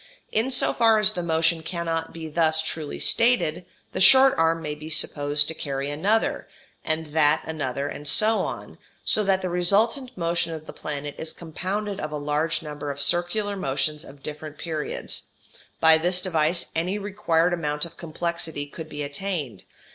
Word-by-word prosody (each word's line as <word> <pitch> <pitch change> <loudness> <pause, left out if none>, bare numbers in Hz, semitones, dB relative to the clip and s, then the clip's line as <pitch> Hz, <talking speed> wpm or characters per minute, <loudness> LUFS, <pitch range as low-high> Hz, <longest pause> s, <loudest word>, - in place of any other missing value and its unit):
In 225 +4 +1
so 255 - +2
far 225 -1 +4
as 215 0 +6
the 180 - -3
motion 165 0 +1
cannot 165 -1 -3
be 165 -1 -7
thus 160 0 +2
truly 155 -2 -4
stated, 230 -8 +2 0.2
the - - -3
short 265 +6 +8
arm 165 0 +2
may 150 -2 -4
be 155 +1 -9
supposed 145 -1 +3
to - - -2
carry 140 -2 -4
another, 200 +10 0 0.4
and 155 -1 -3
that 155 -1 +4
another, 140 -3 -3
and 145 +1 -6
so 220 +7 +5
on, - - -5 0.2
so 215 - +2
that 195 -1 +1
the 185 - -1
resultant 225 +9 +1
motion 170 -1 -1
of 155 -1 -8
the - - -9
planet 145 -1 -5
is 160 - -4
compounded 190 +5 -4
of 155 - -4
a 150 - -3
large 150 +3 -1
number 150 -1 -6
of 140 0 -5
circular 175 +7 0
motions 150 -2 -2
of 140 0 -14
different 150 0 -7
periods; 155 -1 -4 0.5
by 160 0 +6
this 180 +2 +2
device 170 -2 0
any 180 +5 0
required 185 -4 0
amount 150 -3 -1
of 165 - -11
complexity 170 -2 -4
could 155 +2 -9
be 145 -1 -5
attained. 145 - -4
165 Hz, 170 wpm, -24 LUFS, 150-185 Hz, 0.5 s, short